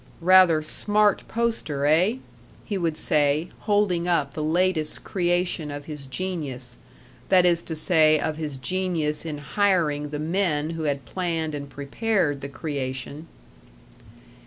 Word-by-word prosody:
"Rather 180 Hz, -3 st, +6 dB
smart 210 Hz, +6 st, +1 dB
poster, 225 Hz, -12 st, -1 dB
eh?" 175 Hz, +9 st, +3 dB, 0.5 s
he 205 Hz, -, -3 dB
would 165 Hz, -4 st, -1 dB
say, 150 Hz, +2 st, +1 dB, 0.2 s
holding 195 Hz, -4 st, +2 dB
up 150 Hz, -6 st, +1 dB
the 155 Hz, -, -3 dB
latest 165 Hz, -1 st, 0 dB
creation 175 Hz, -3 st, -1 dB
of 145 Hz, 0 st, -7 dB
his 150 Hz, -3 st, -8 dB
genius 135 Hz, -7 st, -2 dB, 0.5 s
that 185 Hz, -2 st, +5 dB
is 170 Hz, -1 st, +3 dB
to 160 Hz, -, -4 dB
say, 155 Hz, -1 st, +4 dB
of 155 Hz, -, -1 dB
his 150 Hz, -4 st, -4 dB
genius 165 Hz, -1 st, -1 dB
in 150 Hz, -2 st, -4 dB
hiring 150 Hz, -3 st, 0 dB
the 150 Hz, -, -4 dB
men 160 Hz, -1 st, 0 dB
who 165 Hz, -1 st, -4 dB
had 140 Hz, -3 st, -2 dB
planned 165 Hz, -4 st, -2 dB
and 140 Hz, -1 st, -6 dB
prepared 145 Hz, +1 st, -1 dB
the 140 Hz, -, -6 dB
creation. 140 Hz, +1 st, -5 dB
160 Hz, 135 wpm, -24 LUFS, 145-180 Hz, 0.5 s, Rather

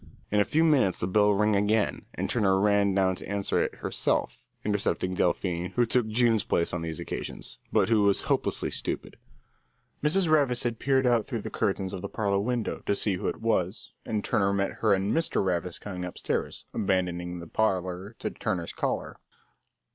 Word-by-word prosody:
In 105 Hz, -, +3 dB
a 105 Hz, -, +4 dB
few 160 Hz, +2 st, +2 dB
minutes 135 Hz, -, +3 dB
the -, -, 0 dB
bell 105 Hz, +3 st, +3 dB
rang 105 Hz, +1 st, +2 dB
again, 105 Hz, +2 st, +1 dB
and -, -, -2 dB
Turner 95 Hz, -5 st, +2 dB
ran 100 Hz, -1 st, +3 dB
down 95 Hz, -1 st, +3 dB
to -, -, -9 dB
answer 100 Hz, -1 st, 0 dB
it -, -, -2 dB
herself, -, -, -1 dB, 0.2 s
intercepting 100 Hz, -2 st, 0 dB
Delphine, 90 Hz, 0 st, -1 dB
who 120 Hz, -, +4 dB
took 120 Hz, 0 st, +1 dB
June's 115 Hz, -1 st, +3 dB
place 85 Hz, -, 0 dB
on 90 Hz, -, -2 dB
these 80 Hz, -2 st, -4 dB
occasions, -, -, -6 dB
but -, -, +3 dB
who 110 Hz, -2 st, +4 dB
was 100 Hz, -1 st, +3 dB
hopelessly -, -, 0 dB
stupid. -, -, -3 dB, 0.9 s
Mrs. 170 Hz, +4 st, +2 dB
Ravis 140 Hz, -6 st, +3 dB
had 120 Hz, -2 st, -2 dB
peered 135 Hz, -1 st, +2 dB
out 120 Hz, -3 st, +2 dB
through 115 Hz, -5 st, -3 dB
the -, -, -6 dB
curtains 95 Hz, -2 st, -1 dB
of 95 Hz, -, -5 dB
the -, -, -5 dB
parlour 100 Hz, -3 st, 0 dB
window 120 Hz, +1 st, -2 dB
to 100 Hz, -, +2 dB
see 100 Hz, 0 st, +3 dB
who -, -, -3 dB
it -, -, -3 dB
was, 95 Hz, -3 st, -1 dB
and 105 Hz, -2 st, -2 dB
Turner 100 Hz, -1 st, +1 dB
met 100 Hz, 0 st, 0 dB
her 110 Hz, -, +3 dB
and 95 Hz, +2 st, -1 dB
Mr. 165 Hz, -11 st, +1 dB
Ravis 90 Hz, -1 st, -1 dB
coming 90 Hz, -3 st, -6 dB
upstairs, 90 Hz, -, -3 dB
abandoning 90 Hz, -2 st, -1 dB
the 85 Hz, -, -8 dB
parlour 95 Hz, +2 st, -1 dB
to -, -, -4 dB
Turner's 95 Hz, -7 st, -3 dB
caller. -, -, -3 dB
100 Hz, 185 wpm, -27 LUFS, 95-115 Hz, 0.9 s, a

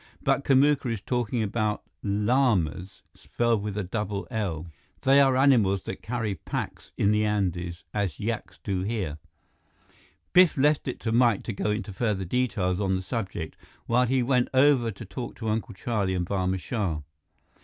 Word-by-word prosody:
But 140 Hz, -, +2 dB
Kamuka 140 Hz, -1 st, +3 dB
is 115 Hz, -, -2 dB
talking 120 Hz, -1 st, -1 dB
about 105 Hz, 0 st, -1 dB, 0.2 s
llamas, 105 Hz, -, +1 dB
spelled 120 Hz, -3 st, 0 dB
with 105 Hz, 0 st, -4 dB
a 105 Hz, -, -1 dB
double 100 Hz, +1 st, -3 dB
'l.' 95 Hz, -8 st, -2 dB, 0.4 s
They 135 Hz, +1 st, +6 dB
are 135 Hz, -2 st, +4 dB
animals 115 Hz, -9 st, +4 dB
that 95 Hz, -, -6 dB
carry 115 Hz, -3 st, -2 dB
packs -, -, -5 dB
in 100 Hz, -, +3 dB
the 105 Hz, 0 st, +2 dB
Andes, 90 Hz, -5 st, -1 dB
as 100 Hz, -8 st, -2 dB
yaks 110 Hz, +1 st, -4 dB
do 95 Hz, -3 st, -1 dB
here." 95 Hz, -7 st, -3 dB, 1.1 s
Biff 180 Hz, -4 st, +6 dB
left 145 Hz, +1 st, +2 dB
it 130 Hz, -, -3 dB
to 110 Hz, -, -1 dB
Mike 115 Hz, -3 st, +3 dB
to 115 Hz, -, -4 dB
go 100 Hz, +1 st, -2 dB
into 105 Hz, -1 st, -2 dB
further 100 Hz, -2 st, -1 dB
details 95 Hz, -4 st, 0 dB
on 95 Hz, -2 st, +1 dB
the 95 Hz, -, -3 dB
subject 95 Hz, -7 st, -4 dB, 0.3 s
while 125 Hz, +2 st, +3 dB
he 130 Hz, 0 st, +2 dB
went 125 Hz, 0 st, +2 dB
over 130 Hz, -3 st, +5 dB
to 110 Hz, +2 st, -8 dB
talk 120 Hz, +4 st, -6 dB
to 110 Hz, -2 st, -4 dB
Uncle 110 Hz, -1 st, -2 dB
Charlie 100 Hz, -3 st, -1 dB
and 90 Hz, -1 st, -1 dB
Barma 95 Hz, 0 st, 0 dB
Shah. 90 Hz, -7 st, -2 dB
105 Hz, 165 wpm, -27 LUFS, 95-125 Hz, 1.1 s, They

